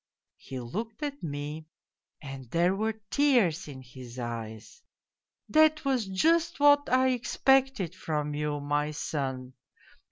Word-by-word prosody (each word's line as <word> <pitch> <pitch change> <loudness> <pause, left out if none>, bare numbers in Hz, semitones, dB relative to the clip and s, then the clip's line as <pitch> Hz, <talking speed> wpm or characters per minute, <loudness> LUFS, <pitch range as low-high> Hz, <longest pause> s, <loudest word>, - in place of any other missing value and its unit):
" - - -61
He 130 -1 -4
looked 215 - -5
at 285 -1 -4
me 150 +1 -5 0.6
and 135 -3 -8
there 175 +6 +2
were 220 +2 -2
tears 240 - +3
in 130 -3 -9
his 125 -1 -11
eyes. 115 - -6 0.3
' - - -64 0.3
That 310 -1 +4
was 255 -6 +1
just 320 - +2
what 290 0 +5
I 260 +1 +4
expected 260 - +2
from 150 -2 -3
you, 150 0 -2
my 145 +1 0
son. 130 -4 -4
165 Hz, 135 wpm, -28 LUFS, -, 0.6 s, what